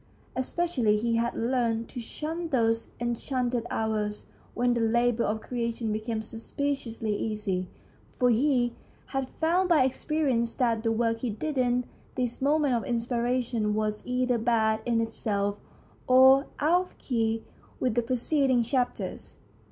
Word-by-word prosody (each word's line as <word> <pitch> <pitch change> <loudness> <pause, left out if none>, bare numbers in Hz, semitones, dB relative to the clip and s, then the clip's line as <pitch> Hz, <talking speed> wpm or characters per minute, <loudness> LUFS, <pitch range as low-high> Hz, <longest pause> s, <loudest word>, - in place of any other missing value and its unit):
Es 260 0 -2
pecially 255 -12 +1
he 230 +1 +1
had 235 +1 0
learned 230 -1 0
to - - -6
shun 320 +8 -4
those 230 -4 +1
enchanted 240 0 -1
hours 215 -1 -2 0.3
when 245 0 +2
the 235 - 0
labour 235 +1 +2
of 220 +1 -1
creation 235 -2 -2
became 220 +1 -3
suspiciously 230 -1 -3
easy, 205 -4 -2 0.5
for 250 -1 +4
he 245 0 +2 0.4
had 270 -1 -1
found 355 +3 +1
by 315 -6 +5
experience 260 -3 0
that 235 -4 +1
the 225 0 +1
work 230 0 +1
he 250 - -2
did 285 +8 -3
in 250 -1 +1 0.3
these 250 -2 -2
moments 285 -2 +3
of 230 - -3
inspiration 235 -2 0
was 215 -1 -1
either 250 -1 0
bad 220 -1 +2
in 230 -1 +2
itself 205 -2 -1 0.5
or 265 +2 +7
out 335 +5 +4
of 370 - -11
key 225 -3 -1 0.4
with 250 -3 +1
the 240 - +2
preceding 255 +1 +2
chapters. 250 +1 -2
240 Hz, 145 wpm, -28 LUFS, 225-260 Hz, 0.5 s, or